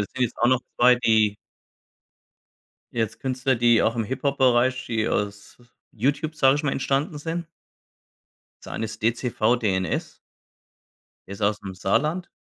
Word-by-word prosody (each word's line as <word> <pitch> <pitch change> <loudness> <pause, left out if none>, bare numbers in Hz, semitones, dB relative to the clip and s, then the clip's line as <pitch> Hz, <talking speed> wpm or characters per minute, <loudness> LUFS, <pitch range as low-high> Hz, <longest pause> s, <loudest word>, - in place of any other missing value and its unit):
sind 130 +5 -8
jetzt 120 - -1
auch 120 - +3
noch 130 -1 +3 0.2
2, 125 +1 +6
die 110 -3 +2 1.6
jetzt 115 -2 -2
Künstler, 130 0 0
die 120 -1 +4
auch 115 +2 +1
im 115 - 0
Hip-Hop-Bereich 130 0 +1
die 110 -2 -1
aus 100 +2 -3 0.3
YouTube, 145 +7 -1
sage 135 -2 +4
ich 150 - -3
mal, 140 - 0
entstanden 140 +4 -1
sind. 165 +2 -4 1.2
Das - - -10
eine 110 - -3
ist 110 0 -10
DCVDNS. 115 -5 0 1.1
Der 100 - -6
ist 100 - -9
aus’m 100 -2 -1
Saarland 155 - 0
120 Hz, 135 wpm, -24 LUFS, 110-135 Hz, 1.6 s, 2